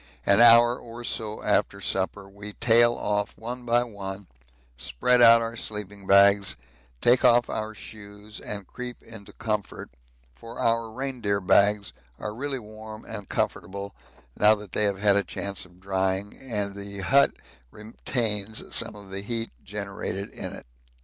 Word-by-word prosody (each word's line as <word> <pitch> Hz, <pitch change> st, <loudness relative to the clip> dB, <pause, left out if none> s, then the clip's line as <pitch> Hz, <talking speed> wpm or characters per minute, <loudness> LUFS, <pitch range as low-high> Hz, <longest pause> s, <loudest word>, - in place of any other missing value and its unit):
An 100 Hz, +3 st, +5 dB
hour 120 Hz, +1 st, +7 dB
or 120 Hz, +1 st, -10 dB
so 110 Hz, -2 st, -3 dB
after 100 Hz, -1 st, +1 dB
supper 95 Hz, +1 st, -2 dB
we 100 Hz, +1 st, -10 dB
tail 120 Hz, +1 st, +4 dB
off 105 Hz, +1 st, -2 dB
one 120 Hz, +2 st, -7 dB
by 120 Hz, +1 st, +3 dB
one, 100 Hz, -3 st, -7 dB, 0.5 s
spread 65 Hz, -, +2 dB
out 115 Hz, 0 st, +8 dB
our 115 Hz, 0 st, -4 dB
sleeping 105 Hz, -3 st, -5 dB
bags, 100 Hz, 0 st, +5 dB, 0.5 s
take 125 Hz, +2 st, +4 dB
off 120 Hz, -1 st, +4 dB
our 110 Hz, 0 st, -4 dB
shoes 105 Hz, +1 st, -11 dB
and 100 Hz, -2 st, -4 dB
creep 125 Hz, +5 st, -8 dB
into 110 Hz, -3 st, -11 dB
comfort, 105 Hz, -3 st, -4 dB, 0.4 s
for 115 Hz, -, -11 dB
our 115 Hz, 0 st, +1 dB
reindeer 120 Hz, -4 st, -2 dB
bags 100 Hz, +1 st, +3 dB, 0.2 s
are 105 Hz, -, -5 dB
really 135 Hz, +4 st, -3 dB
warm 110 Hz, -1 st, -10 dB
and 105 Hz, -3 st, -7 dB
comfortable 100 Hz, +1 st, -3 dB, 0.4 s
now 105 Hz, +1 st, +5 dB
that 105 Hz, -2 st, -11 dB
they 105 Hz, -, +1 dB
have 100 Hz, -1 st, 0 dB
had 100 Hz, 0 st, +3 dB
a 100 Hz, -, +2 dB
chance 100 Hz, +2 st, -4 dB
of 90 Hz, 0 st, -20 dB
drying, 95 Hz, +1 st, -1 dB
and 105 Hz, -6 st, -3 dB
the 100 Hz, 0 st, -7 dB
hut 140 Hz, +7 st, +4 dB, 0.4 s
retains 110 Hz, -, -3 dB
some -, -, +1 dB
of 100 Hz, -2 st, -13 dB
the 95 Hz, +1 st, -4 dB
heat 115 Hz, +2 st, -3 dB
generated 100 Hz, -1 st, -5 dB
in -, -, -6 dB
it. -, -, -10 dB
105 Hz, 155 wpm, -26 LUFS, 100-115 Hz, 0.5 s, out